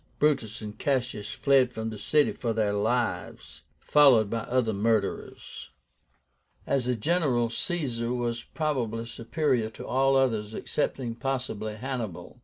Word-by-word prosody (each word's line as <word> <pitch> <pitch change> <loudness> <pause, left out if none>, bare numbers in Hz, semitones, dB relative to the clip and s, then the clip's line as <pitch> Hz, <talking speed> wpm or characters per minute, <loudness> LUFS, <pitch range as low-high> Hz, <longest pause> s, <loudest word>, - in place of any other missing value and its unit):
Brutus 120 -8 +1
and 105 -1 -7
Cassius 125 -6 -1
fled 135 -3 +3
from 110 -1 -4
the 105 - -7
city 150 +5 +3
for 115 -2 -2
their 105 -2 +1
lives, 115 +4 -2 0.2
followed 130 -8 +5
by 115 -1 -2
the - - -13
other 125 -3 +2
murderers. 105 0 -2 1.0
As 135 -3 0
a 125 - +1
general 125 -4 +1
Caesar 125 -9 -1
was 120 -1 -2
probably 120 -7 -2
superior 115 +1 -1
to 110 - -10
all 135 +1 +2
others, 110 -5 +1
excepting 130 -5 -2
possibly 120 -5 -3
Hannibal. 120 -6 -5
120 Hz, 135 wpm, -27 LUFS, 110-135 Hz, 1.0 s, followed